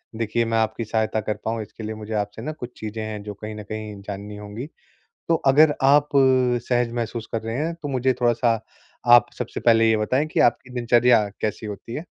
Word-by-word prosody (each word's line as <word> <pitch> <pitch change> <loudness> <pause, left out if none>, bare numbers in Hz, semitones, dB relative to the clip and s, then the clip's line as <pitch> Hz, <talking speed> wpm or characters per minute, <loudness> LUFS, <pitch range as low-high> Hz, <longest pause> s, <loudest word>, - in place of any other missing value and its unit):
देखिए 115 +1 0
मैं 115 0 0
आपकी 110 +1 0
सहायता 110 0 0
कर 105 0 -2
पाऊँ 115 0 -1
इसके 110 +1 -10
लिए 110 0 -4
मुझे 110 0 -7
आपसे 105 +1 -3
ना 155 - -4
कुछ 125 -5 -9
चीज़ें 110 0 -5
हैं 105 -1 -5
जो 105 -1 -6
कहीं 105 +2 -8
न 105 - -7
कहीं 105 -1 -7
जाननी 100 +1 -7
होंगी। 105 +6 -7 0.6
तो 165 - +4
अगर 145 +2 +6
आप 145 +2 +5 0.6
सहज 120 -1 +1
महसूस 115 -1 -3
कर 115 - -2
रहे 115 +1 -4
हैं 165 +4 -1
तो 145 - -3
मुझे 130 -1 +1
थोड़ा-सा 120 -2 +2 0.5
आप 120 0 +7
सबसे - - -4
पहले 115 -1 +4
ये 110 - +3
बताएँ 130 +8 +1
कि - - -1
आपकी 120 +1 +2
दिनचर्या 120 -3 +4
कैसी 110 0 -3
होती 105 +3 -7
है? 160 - -5
115 Hz, 205 wpm, -23 LUFS, 105-125 Hz, 0.6 s, आप